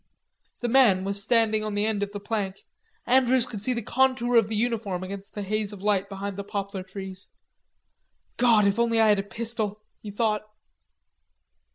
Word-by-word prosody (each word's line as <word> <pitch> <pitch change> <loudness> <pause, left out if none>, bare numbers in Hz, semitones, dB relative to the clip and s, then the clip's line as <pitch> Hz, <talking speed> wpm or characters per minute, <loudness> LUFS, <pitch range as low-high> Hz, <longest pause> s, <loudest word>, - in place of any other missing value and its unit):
The 240 - 0
man 230 -7 +5
was 200 +1 -2
standing 220 -1 +2
on 215 -1 -3
the 205 +1 +1
end 215 -2 -1
of 205 0 -2
the 205 - -5
plank. 200 -2 -3 0.4
Andrews 255 -1 +4
could 210 -5 -7
see 250 +4 +1
the 235 -2 -3
contour 255 0 +2
of 225 -3 +5
the 220 - -3
uniform 215 -5 -1
against 195 +1 -8
the 205 - -3
haze 215 +1 -2
of 195 -1 -10
light 200 -2 +1
behind 200 0 -5
the 200 - -4
poplar 200 -1 -4
trees. 190 0 -7 1.1
"God, 230 -4 +5
if 200 +3 +2
I - - +5
only 230 -1 +2
had 215 -2 +5
a - - +2
pistol," 215 0 -4 0.2
he 210 - -7
thought. 210 0 0
210 Hz, 185 wpm, -26 LUFS, 200-230 Hz, 1.1 s, man